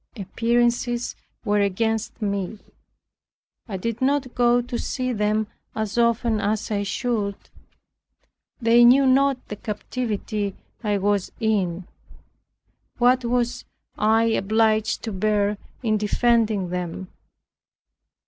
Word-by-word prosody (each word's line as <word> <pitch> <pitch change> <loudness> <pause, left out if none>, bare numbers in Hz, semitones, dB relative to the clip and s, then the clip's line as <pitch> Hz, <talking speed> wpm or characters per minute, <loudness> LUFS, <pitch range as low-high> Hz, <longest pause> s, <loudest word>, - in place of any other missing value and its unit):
Appearances 235 +4 0 0.3
were 205 -1 +2
against 220 +4 -1
me. 200 0 -2 1.1
I 200 -4 -4
did 230 +5 -4
not 265 -1 +1
go 245 0 +3
to 245 0 -4
see 255 -1 -2
them 210 0 +1 0.3
as 220 -1 -3
often 235 -1 +2
as 215 +1 -1
I 205 -1 0
should. 205 -1 -1 1.2
They 235 0 +5
knew 260 +3 +7
not 270 0 +2
the 210 - -5
captivity 210 -2 -3 0.3
I 205 -2 +1
was 200 -1 0
in; 190 -5 0 1.1
what 250 +1 +4
I - - -2
was 245 0 0 0.4
obliged 220 0 +2
to 225 - -3
bear 205 +1 0 0.2
in 215 -2 +2
defending 215 -2 +1
them. 180 +1 -4
220 Hz, 110 wpm, -23 LUFS, 205-240 Hz, 1.2 s, knew